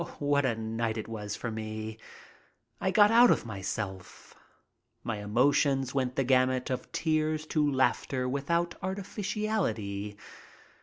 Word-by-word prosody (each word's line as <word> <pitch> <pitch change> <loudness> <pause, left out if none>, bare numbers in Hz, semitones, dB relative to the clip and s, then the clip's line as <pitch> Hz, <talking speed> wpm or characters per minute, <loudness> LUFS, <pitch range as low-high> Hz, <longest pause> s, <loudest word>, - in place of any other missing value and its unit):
What 145 -1 +2
a 115 - 0
night 115 0 -2
it 110 - -4
was 105 -2 -5
for 115 - -4
me! 110 0 -5 0.8
I 190 - 0
got 205 +2 +6
out 240 +1 +7
of - - +2
myself. 95 -2 -6 0.7
My 115 -2 -2
emotions 130 +4 +2
went 130 -2 -1
the 135 - +2
gamut 130 0 +2
of 130 - -4
tears 155 -1 0
to 150 -2 +3
laughter 130 -1 +1
without 170 +6 0
artificiality. 185 - -2
130 Hz, 130 wpm, -29 LUFS, 110-155 Hz, 0.8 s, out